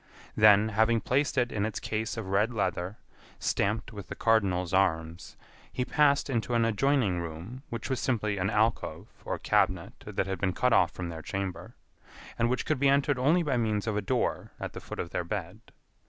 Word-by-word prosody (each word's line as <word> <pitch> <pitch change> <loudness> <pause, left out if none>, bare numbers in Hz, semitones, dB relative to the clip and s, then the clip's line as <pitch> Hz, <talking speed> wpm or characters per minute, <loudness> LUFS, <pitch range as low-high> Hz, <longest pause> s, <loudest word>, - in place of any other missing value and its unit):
Then, 110 0 +6
having 110 +2 +3
placed 135 +7 0
it 125 -1 +2
in 100 - -1
its 110 0 -2
case 110 +1 -3
of 105 -4 -5
red 105 +5 +2
leather, 95 -3 -2 0.4
stamped 110 +3 -1
with 100 -3 -8
the - - -6
Cardinal's 95 -6 +1
arms, 80 -3 0 0.3
he 125 - -2
passed 145 -1 +3
into 120 -2 -1
an 115 -1 +3
adjoining 115 -4 +2
room 85 +10 -7
which 115 -2 -5
was 130 -2 -1
simply 105 -5 -1
an 90 +1 0
alcove 110 +1 0 0.2
or - - -2
cabinet - - +1
that - - -1
had 95 0 -3
been 95 -2 0
cut 125 +3 +2
off - - +5
from 90 -2 -6
their 80 -1 -6
chamber, 95 0 -5 0.6
and 115 +1 +3
which 125 - -1
could 155 -4 0
be 140 0 +4
entered 140 -1 +2
only 155 +7 +3
by 140 -5 0
means 110 -3 0
of 110 -2 -1
a 105 - 0
door 100 - -1
at - - -5
the - - -7
foot - - -8
of 85 - -4
their 90 - -1
bed. 85 - -5
110 Hz, 200 wpm, -29 LUFS, 95-125 Hz, 0.6 s, Then